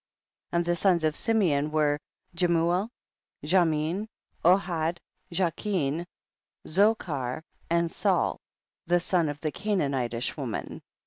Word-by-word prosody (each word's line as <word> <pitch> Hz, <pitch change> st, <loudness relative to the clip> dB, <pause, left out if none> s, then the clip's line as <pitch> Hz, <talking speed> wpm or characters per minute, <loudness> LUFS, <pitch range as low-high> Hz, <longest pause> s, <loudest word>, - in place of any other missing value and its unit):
8. -, -, -4 dB
And 170 Hz, -, +1 dB
the 175 Hz, 0 st, +1 dB
sons 175 Hz, -2 st, +3 dB
of 155 Hz, -1 st, +1 dB
Simeon 165 Hz, -10 st, +2 dB
were 150 Hz, -1 st, +2 dB, 0.3 s
Jemuel, 175 Hz, +3 st, +2 dB, 0.6 s
Jamin, 170 Hz, +3 st, +2 dB, 0.4 s
Ohad, 175 Hz, -2 st, +2 dB, 0.3 s
Jachin, 170 Hz, -2 st, -1 dB, 0.6 s
Zochar 160 Hz, -, +1 dB, 0.3 s
and 170 Hz, 0 st, +1 dB
Saul, -, -, +1 dB, 0.5 s
the 175 Hz, +1 st, +4 dB
son 175 Hz, -3 st, +1 dB
of 145 Hz, 0 st, -5 dB
the 155 Hz, -, -1 dB
Canaanitish 140 Hz, -, -1 dB
woman. 130 Hz, -8 st, -5 dB
170 Hz, 110 wpm, -27 LUFS, 150-180 Hz, 0.6 s, the